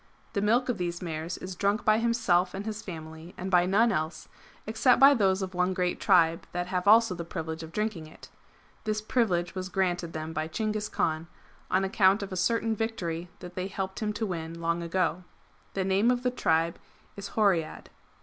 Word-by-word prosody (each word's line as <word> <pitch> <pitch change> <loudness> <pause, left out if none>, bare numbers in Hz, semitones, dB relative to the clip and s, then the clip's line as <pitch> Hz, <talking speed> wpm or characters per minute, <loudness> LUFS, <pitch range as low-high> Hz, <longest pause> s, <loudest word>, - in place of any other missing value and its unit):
The 200 - 0
milk 235 +5 +2
of 240 -6 -1
these 175 -1 -2
mares 165 0 -4
is 185 0 -7
drunk 200 +4 0
by 215 0 +4
himself 190 -6 +2
and 200 +2 -5
his 215 0 -4
family, 160 -2 -9
and 190 +1 -5
by 180 -1 +4
none 225 +5 +4
else, 155 -3 -3 0.4
except 225 +4 +3
by 275 +2 +9
those 195 -5 +2
of 190 0 -5
one 180 +1 0
great 180 -1 -1
tribe 165 -2 +3
that 175 0 -1
have 180 +1 -2
also 225 -1 +6
the 170 -1 -5
privilege 160 -1 -5
of 160 0 -9
drinking 210 -5 -3
it. - - -14 0.6
This 215 -1 -1
privilege 195 -7 0
was 185 0 -4
granted 180 -3 -1
them 155 +1 -5
by 155 0 -2
Chinghis 215 +3 -2
Kaan, 160 +1 -1 0.4
on 190 +1 +2
account 195 0 +3
of 200 - -7
a - - -3
certain 225 +4 +1
victory 180 -6 -3
that 180 -1 -9
they 185 +1 -3
helped 190 -1 -4
him 215 -1 -1
to 210 +2 -2
win 165 -3 -5
lone 170 0 -1
a,eo. 180 0 -1 0.5
The 195 - 0
name 195 +4 +3
of 250 0 +1
the 250 - +1
tribe 165 -8 +1 0.4
is 200 0 -8
Horiad.' 190 -7 +1
185 Hz, 200 wpm, -28 LUFS, 170-215 Hz, 0.6 s, by